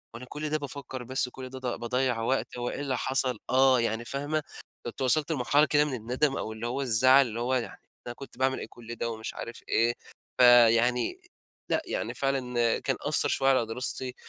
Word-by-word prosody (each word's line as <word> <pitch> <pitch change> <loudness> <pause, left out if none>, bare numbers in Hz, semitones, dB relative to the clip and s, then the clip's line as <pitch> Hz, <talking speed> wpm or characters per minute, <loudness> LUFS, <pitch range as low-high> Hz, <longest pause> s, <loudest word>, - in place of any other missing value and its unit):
أنا 125 - -8
كل 150 +1 -4
ده 155 - +1
بافكر 140 -3 -7
بس 130 +1 -1
وكل 130 0 -9
ده 130 0 -8
ض 130 - -10
باضَّيع 125 0 -1
وقت؟ 130 +1 -1
هو 120 0 -2
إيه - - -5
اللي 135 -3 -2
حصل؟ 130 -3 0
آه، 130 -1 +5
يعني 115 0 -1
فاهمة؟ 145 +4 -2 0.4
كنت 120 +3 -6
وصلت 150 +5 +2
لمرحلة 145 +2 +3
كده 145 +1 +3
من 145 - -4
الندم 130 +5 -1
أو 110 - -4
اللي 115 +2 -5
هو 135 +3 -2
الزعل 130 +2 +5
اللي 115 +1 -5
هو 125 +2 -1
يعني 120 -2 -4 0.3
أنا 120 - -4
كنت 135 -3 -12
باعمل 130 0 +1
إيه - - -6
كل 120 0 -10
ده، 115 - -3
ومش 110 -1 -6
عارف 115 - -8
إيه. 115 +1 +2 0.5
فيعني 120 - +5 0.5
لأ، - - +2
يعني - - -3
فعلًا 125 -4 0
كان - - -1
أثّر - - +2
شوية 135 0 +2
على 130 -4 +3
دراستي، 125 +2 -2
130 Hz, 200 wpm, -28 LUFS, 120-135 Hz, 0.5 s, آه